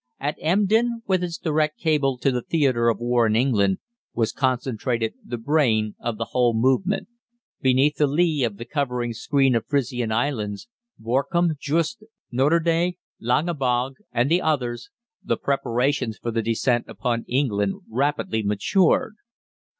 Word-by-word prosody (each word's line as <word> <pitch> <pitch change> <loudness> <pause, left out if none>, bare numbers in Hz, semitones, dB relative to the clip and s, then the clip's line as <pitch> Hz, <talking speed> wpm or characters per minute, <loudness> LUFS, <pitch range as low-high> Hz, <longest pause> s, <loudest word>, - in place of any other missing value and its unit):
At 145 +2 -2
Emden, 220 +7 +2
with 185 -2 +1
its 170 -1 -3
direct 155 -1 0
cable 145 -5 +1
to 135 - +1
the 125 -1 -1
theatre 130 -6 +2
of 115 - 0
war 120 -1 +2
in 110 - +1
England, 105 -6 +2 0.4
was 115 -2 +1
concentrated 125 -3 -1
the 120 - -5
brain 115 -5 +1
of 115 -2 -3
the - - -4
whole 120 -2 +2
movement. 130 - +1 0.5
Beneath 135 +3 +3
the 150 - +3
lee 155 -1 +1
of 110 -4 -1
the 120 - -7
covering 125 -3 -2
screen 135 +3 +2
of 115 - -1
Frisian 125 -5 -1
Islands, 110 - -2 0.3
Borkum, 140 +9 +1
Juist, 165 +10 -1 0.3
Norderney, 165 +6 +2 0.2
Langebog, 130 -1 0
and 120 +1 +1
the 175 +2 +4
others, 130 - -1 0.3
the - - 0
preparations 125 -2 0
for 120 - -4
the 115 0 0
descent 115 +2 0
upon 120 -2 -2
England 105 -7 0
rapidly 120 -2 -1
matured. 175 - +1
130 Hz, 140 wpm, -23 LUFS, 115-155 Hz, 0.5 s, the